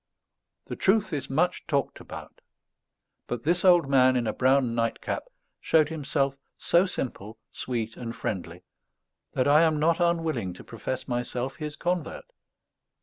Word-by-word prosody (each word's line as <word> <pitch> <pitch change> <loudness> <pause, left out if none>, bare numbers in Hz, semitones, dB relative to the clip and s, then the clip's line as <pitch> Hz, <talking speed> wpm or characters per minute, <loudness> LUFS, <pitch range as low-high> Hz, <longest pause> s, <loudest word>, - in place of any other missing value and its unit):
The - - -5
truth 195 -1 +2
is 145 - -3
much 160 +7 0
talked 140 -3 -1
about; - - -10 0.9
but 120 -2 -4
this 175 +3 +1
old 175 -5 +6
man 130 -2 +5
in 120 -2 +1
a 110 - -1
brown 130 -2 +3
nightcap 115 - -2 0.3
showed 155 -2 +3
himself 140 -3 -1 0.2
so 175 +3 +3
simple, 110 - -5
sweet 115 -3 -4
and 115 -2 -6
friendly, 95 -4 -5 0.7
that 130 - +1
I 150 +2 +6
am 160 -2 +3
not 165 +3 +2
unwilling 165 - 0
to 90 - -12
profess 125 +3 -5
myself 125 +1 -3
his 150 -2 -5
convert. 175 -2 -2
135 Hz, 145 wpm, -27 LUFS, 120-165 Hz, 0.9 s, old